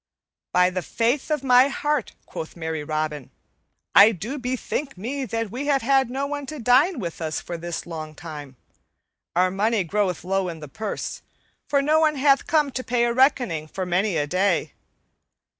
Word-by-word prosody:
"By 180 0 +4
the 185 0 -2
faith 240 - 0
of 300 -3 0
my 255 0 +6
heart," 295 0 -1
quoth 160 - -7
merry 160 -2 -4
Robin, 155 -2 -3 0.6
"I 205 +3 +9
do 230 - -5
bethink 255 +1 -3
me 260 +8 -3
that 230 -2 -3
we 270 +4 -4
have 275 -3 +2
had 270 0 +3
no 270 +2 -2
one 285 -1 -4
to 310 - -6
dine 265 - +4
with 170 -7 -5
us 160 -1 -2
for 175 - -6
this 170 0 -5
long 155 -2 -7
time. 150 -4 -9 0.8
Our 185 +1 +3
money 210 +2 +1
groweth 185 0 -1
low 190 0 0
in 165 -2 -7
the 150 - -8
purse, 210 +9 -5 0.5
for 280 -1 +2
no 305 +2 +3
one 310 -1 +3
hath 275 0 +3
come 300 -3 +2
to 255 - -4
pay 245 -1 +1
a 235 - 0
reckoning 245 - +2
for 185 +4 -4
many 180 +1 +1
a 145 - +1
day. 180 -2 0
220 Hz, 180 wpm, -24 LUFS, 170-270 Hz, 0.8 s, I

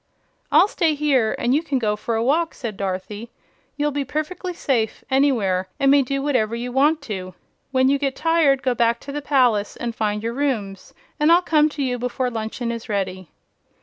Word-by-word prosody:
"I'll - - +6
stay 325 -6 +1
here, 275 -7 +1
and 245 - +1
you 295 - +3
can 285 -5 -1
go 215 -4 0
for 225 +2 -3
a 225 - 0
walk," 320 +6 +1
said 230 -5 -5
Dorothy. 195 +4 -5 0.5
"You'll 295 0 0
be 285 0 -2
perfec'ly 310 +6 -4
safe 250 -10 -1
anywhere, 220 -10 +2
and 275 -1 +4
may 285 0 +6
do 275 +1 -2
whatever 240 -6 0
you 245 +1 -4
want 295 +5 +2
to. 185 -4 -6 0.3
When 260 -1 +2
you 280 +1 +2
get 275 -2 -1
tired, 320 -5 +2
go 255 - +2
back 235 -1 +1
to 280 - -8
the 295 +1 -4
palace 250 -8 +2
and 235 -1 -4
find 210 -1 -2
your 230 +1 -2
rooms, 230 -8 -3 0.2
and 300 +2 +4
I'll 345 +2 +5
come 310 -2 +3
to 295 -1 -4
you 250 -2 -1
before 250 +1 -2
luncheon 230 +1 -4
is 230 0 -7
ready." 190 -3 -3
255 Hz, 200 wpm, -22 LUFS, 220-285 Hz, 0.5 s, I'll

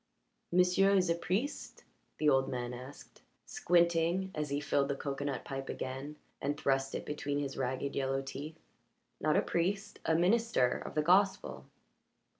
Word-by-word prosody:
"M'sieu' 180 +2 +4
is 180 -3 +3
a - - +5
priest?" 185 - -3 0.3
the 155 - +1
old 135 -2 +4
man 125 -1 -3
asked, 130 +3 -11 0.2
squinting 170 +2 +2
at 150 -1 -3
he 140 +1 0
filled 140 -1 +1
the 140 - -1
cocoanut 140 -1 -3
pipe 135 -1 -5
again 135 +3 -5 0.3
and 145 +1 -1
thrust 135 -1 +1
it - - -4
between 145 -1 -2
his 140 -2 -3
ragged 130 +2 -2
yellow 135 0 0
teeth. 145 +4 -7 0.6
"Not 155 0 +2
a - - +3
priest. 195 +4 -1
A 160 - +2
minister 185 - +3
of - - -8
the 150 - +2
gospel." 190 +4 +2
150 Hz, 155 wpm, -32 LUFS, 135-180 Hz, 0.6 s, a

